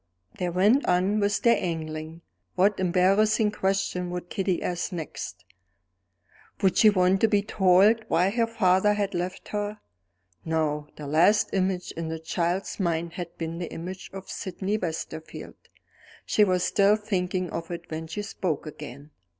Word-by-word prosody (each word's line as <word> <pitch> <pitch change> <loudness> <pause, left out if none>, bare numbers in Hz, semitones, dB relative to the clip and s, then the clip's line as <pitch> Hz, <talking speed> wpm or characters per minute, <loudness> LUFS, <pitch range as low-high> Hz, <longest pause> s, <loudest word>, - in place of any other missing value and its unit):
They 180 - 0
went 205 +10 +3
on 185 +4 +2
with 205 0 0
their 235 -1 +4
angling. 160 -1 -5 0.3
What 195 +2 +3
embarrassing 195 +4 +3
question 195 -3 -1
would 180 0 -6
Kitty 190 -3 -1
ask 180 +1 -2
next? 95 - -6 1.2
Would 190 -2 +4
she 215 - +7
want 185 -1 +3
to 225 - +5
be 205 -2 +2
told 200 +2 +4
why 180 +4 +2
her 230 +1 +1
father 210 -2 +3
had 200 -1 -1
left 180 +1 -4
her? 210 0 -3 0.6
No: 155 -2 -1
the 150 - -8
last 170 +9 +3
image 185 -1 0
in 165 -1 -5
the 160 - -3
child's 170 +5 -2
mind 170 -2 -1
had 175 -2 -7
been 165 0 -4
the 175 - -5
image 185 +3 -7
of 195 0 -9
Sydney 190 +1 -3
Westerfield. 165 -4 -5 0.7
She 210 - +3
was 185 -3 +2
still 200 +1 +4
thinking 185 -4 -2
of 165 0 -5
it 170 -1 -6
when 160 +1 -4
she 205 +6 -4
spoke 175 -7 -3
again. 150 -1 -9
185 Hz, 155 wpm, -26 LUFS, 165-200 Hz, 1.2 s, she